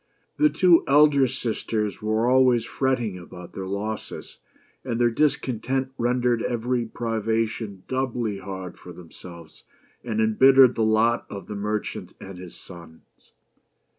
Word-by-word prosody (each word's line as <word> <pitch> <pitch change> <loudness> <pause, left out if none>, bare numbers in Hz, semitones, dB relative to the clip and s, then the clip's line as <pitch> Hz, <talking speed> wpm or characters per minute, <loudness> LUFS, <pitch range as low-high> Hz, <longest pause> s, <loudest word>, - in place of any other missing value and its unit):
The 305 0 +4
two 180 - +4
elder 140 -1 +5
sisters 110 -4 -3
were 110 +2 0
always 125 -2 +4
fretting 120 -8 -1
about 90 0 -12
their 95 -1 -6
losses, 105 +3 -6 0.4
and 120 -3 -3
their 120 -1 +3
discontent 130 -1 -1
rendered 120 -1 0
every 120 +1 -1
privation 110 -3 -3
doubly 125 -6 -2
hard 95 -2 -8
for 90 - -11
themselves, 85 -1 -13 0.4
and 110 -3 -3
embittered 130 +4 +6
the - - -3
lot 110 +2 +2
of 100 -1 -8
the - - -7
merchant 105 +1 -4
and 95 -2 -10
his 90 -2 -10
sons. 85 -3 -15
115 Hz, 130 wpm, -24 LUFS, 100-125 Hz, 0.4 s, embittered